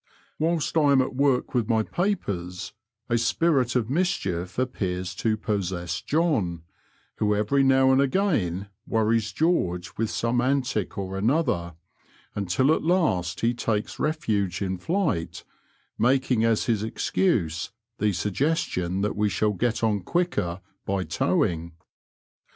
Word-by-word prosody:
Whilst 165 0 0
I 145 -3 +5
am 135 - +5
at 130 - -5
work 135 -2 +1
with 120 -3 0
my 110 -1 +3
papers 100 - -3 0.3
a 120 -1 +1
spirit 130 0 +2
of 120 -4 +1
mischief 120 - -1
appears 95 -8 -2
to 110 -1 +1
possess 95 -5 -2
John, 130 - 0 0.5
who 105 -1 +2
every 105 +7 +2
now 135 0 +5
and 130 +1 +4
again 130 - 0 0.2
worries 110 -1 +1
George 95 - 0
with 115 -1 0
some 120 +1 0
antic 130 -5 0
or 95 -1 -4
another, 110 - 0 0.6
until 105 - +2
at - - 0
last 155 - +1
he 115 +1 +2
takes 110 0 -2
refuge 110 - 0
in 95 -2 -2
flight, 155 - -1 0.6
making 125 -2 +2
as 115 -2 +2
his 110 -4 +1
excuse 105 - 0 0.3
the 105 0 +2
suggestion 95 - -1
that 105 - -1
we 105 0 +1
«hall 105 +3 +1
get 115 +3 -1
on 105 -2 +2
quicker 95 - -1 0.2
by 95 -1 -1
towing. 85 -2 0
110 Hz, 135 wpm, -25 LUFS, 95-135 Hz, 0.6 s, I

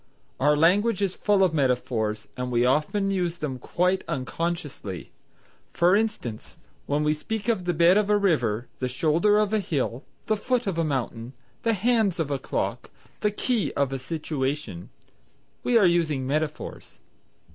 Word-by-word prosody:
Our 150 +2 +4
language 195 +7 +3
is 190 -2 0
full 205 -2 +2
of 180 -4 +2
metaphors, 120 -6 0
and 125 0 -3
we 120 -1 +2
very - - +4
often 155 +10 +1
use 175 -3 -1
them 135 -6 -4
quite 180 +8 0
unconsciously. 140 - -4 0.6
For 175 +3 +4
instance, 210 - -3 0.3
when 145 +1 +1
we 150 0 +3
speak 215 +8 -5
of 215 -6 0
the 175 - +1
bed 170 +4 +5
of 210 -1 -1
a 210 - +5
river, 125 - +1
the 130 - -1
shoulder 160 +10 +2
of 210 0 +1
a 215 - +3
hill, 140 - -2 0.2
the 215 - +1
foot 250 +3 -1
of 185 -4 -1
a - - +2
mountain, 130 -4 -3 0.3
the 230 - +2
hands 220 -3 +1
of 150 -3 -1
a 140 - -1
clock, - - -3 0.3
the 210 - +2
key 220 +1 0
of 140 -1 0
a 135 - -2
situation, 140 - -3 0.7
we 245 - +3
are 210 - +5
using 160 -6 +2
metaphors. 150 +2 -3
165 Hz, 170 wpm, -25 LUFS, 130-200 Hz, 0.7 s, bed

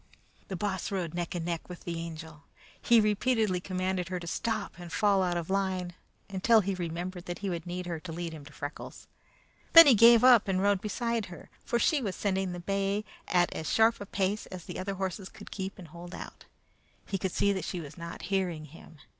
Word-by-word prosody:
The 190 - -4
Boss 190 0 -2
rode 180 -5 -2
neck 175 +1 -3
and 170 -2 -3
neck 170 0 -3
with 180 - -9
the 170 -1 -4
Angel. 160 -2 -8 0.4
He 235 -1 +5
repeatedly 215 -2 +2
commanded 185 0 -2
her 180 -1 -2
to 170 - -8
stop 220 +2 -3
and 175 -1 -9
fall 200 -1 +3
out 175 -1 0
of 170 -2 -3
line, 190 -2 -1 0.3
until 210 +3 +4
he 195 0 -1
remembered 175 0 -4
that 175 - -4
he 195 - 0
would 170 -1 -5
need 180 +1 -4
her 170 -2 -4
to 165 +1 -8
lead 170 0 -4
him 155 -2 -9
to 145 - -12
Freckles. 145 +1 -8 0.7
Then 330 0 +12
he 280 - +7
gave 230 +1 +7
up 245 -5 +7
and 190 -1 +1
rode 200 -1 +2
beside 230 0 -2
her, 175 -3 -12
for 235 - 0
she 290 +4 +2
was 200 -6 -3
sending 190 -2 -1
the 175 - -5
bay 195 +3 -1 0.2
at 175 -1 +2
as 160 - -4
sharp 225 -1 +4
a 200 - -6
pace 200 +1 -1
as 180 -3 -9
the - - -6
other 195 +1 -3
horses 190 0 -4
could - - -13
keep 190 -1 -5
and 175 -4 -11
hold 175 +2 -9
out. - - -10 0.6
He 195 - -3
could 190 0 -2
see 200 +3 +2
that 190 - -3
she 180 - -4
was 150 -2 -9
not 170 -1 -8
hearing 180 -5 -1
him. 160 +1 -15
185 Hz, 220 wpm, -29 LUFS, 175-200 Hz, 0.7 s, Then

